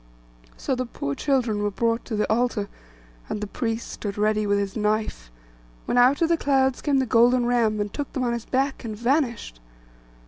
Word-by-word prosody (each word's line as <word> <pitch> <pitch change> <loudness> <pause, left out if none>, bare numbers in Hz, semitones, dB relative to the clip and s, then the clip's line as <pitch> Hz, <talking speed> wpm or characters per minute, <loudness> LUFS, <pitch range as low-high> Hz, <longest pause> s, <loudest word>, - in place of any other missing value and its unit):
So - - -2
the 255 -1 -2
poor 140 -11 -4
children 240 - 0
were 205 - +1
brought 230 +3 -1
to 225 - -4
the 210 - 0
altar, 220 -2 0 0.6
and 210 - -3
the 210 - -3
priest 225 +2 -3
stood 205 -1 -6
ready 215 0 +1
with 205 0 +2
his 200 -1 -2
knife, 210 - -1 0.6
when - - -1
out 255 +6 +5
of 330 - +2
the 335 - +3
clouds 265 -3 +1
came 285 -2 +1
the 265 - +2
Golden 240 +1 +4
Ram, 230 -3 +2
and 205 -1 -3
took 290 -2 -4
them 260 - -1
on 240 -1 0
his 235 -1 -4
back, 270 +1 -1
and 220 -3 -5
vanished. 235 - -1
235 Hz, 200 wpm, -24 LUFS, 210-255 Hz, 0.6 s, out